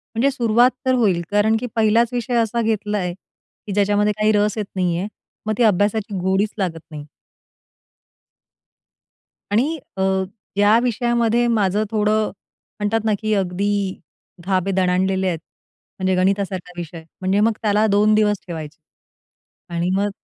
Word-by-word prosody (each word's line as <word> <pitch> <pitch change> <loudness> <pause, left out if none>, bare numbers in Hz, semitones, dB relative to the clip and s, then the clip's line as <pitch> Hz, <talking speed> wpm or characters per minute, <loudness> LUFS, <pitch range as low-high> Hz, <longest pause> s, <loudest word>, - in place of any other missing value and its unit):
म्हणजे 275 +5 +2
सुरुवात 240 0 +3
तर 260 - +3
होईल, 200 -8 +2
कारण 210 +2 +3
की 250 - -4
1हिलाच 225 +1 +3
विषय 245 0 -2
असा 230 +1 -1
घेतला 210 -2 -1
आहे 180 -3 -2
की 200 +2 -15
ज्याच्यामध्ये 205 +1 +2
काही 215 0 +3
रस 210 +1 +1
येत 210 - -1
नाहीये, 180 +1 0 0.4
मग 215 - 0
ती 240 - +3
अभ्यासाची 205 0 +1
गोडीच 190 +3 0
लागत 175 -5 -2
नाही. 150 -1 -8 2.5
आणि 285 +10 +1 0.2
अ, 190 - -1 0.5
या 205 +2 +5
विषयामध्ये 240 0 +1
माझं 210 -2 +1
थोडं 215 0 +1 0.5
म्हणतात 210 +2 +1
ना, 220 - +2
की 215 -1 0
अगदी 195 +1 -1 0.5
धाबे 190 0 +1
दणाणलेले 190 +1 +1
आहेत. 165 -3 -1 0.6
म्हणजे 185 0 +1
गणितासारखा 185 -1 -1
विषय 165 -1 -7 0.2
म्हणजे 190 +2 +1
मग 225 +2 +3
त्याला 210 0 +3
2 210 +2 +4
दिवस 210 -1 +3
ठेवायचे 160 -3 -7 1.0
आणि 170 +1 0
मग 200 +1 +1
205 Hz, 140 wpm, -21 LUFS, 190-220 Hz, 2.5 s, या